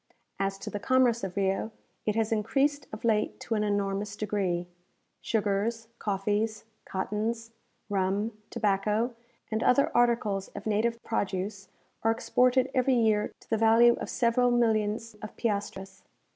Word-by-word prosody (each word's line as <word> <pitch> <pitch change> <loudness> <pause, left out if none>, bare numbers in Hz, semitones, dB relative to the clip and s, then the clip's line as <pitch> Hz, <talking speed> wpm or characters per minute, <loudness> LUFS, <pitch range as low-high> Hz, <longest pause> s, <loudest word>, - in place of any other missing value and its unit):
As 195 0 -1
to - - -7
the 205 - -3
commerce 245 0 +3
of 195 0 -4
Rio, 195 +2 0 0.4
it 210 - +1
has 225 0 0
increased 275 +7 +1
of 215 +2 -7
late 215 -2 +1
to 230 - -3
an 210 -1 +1
enormous 205 0 -1
degree. 195 -5 -1 0.6
Sugars, 220 +2 -1
coffees, 210 +2 -1 0.2
cottons, 220 +4 -3 0.4
rum, 200 +2 0
tobacco, 210 +4 0 0.4
and 220 0 0
other 280 +3 +4
articles 230 -5 +2
of 205 - -7
native 220 +2 +1
produce, 195 -2 -3 0.3
are 225 - +2
exported 250 +3 +2
every 260 0 +3
year 220 -3 +2
to - - -21
the 225 - +3
value 225 +2 +6
of - - -4
several 245 +1 +2
millions 225 -2 +1
of 215 - -8
piastres. 200 -3 -3
215 Hz, 140 wpm, -28 LUFS, 200-230 Hz, 0.6 s, value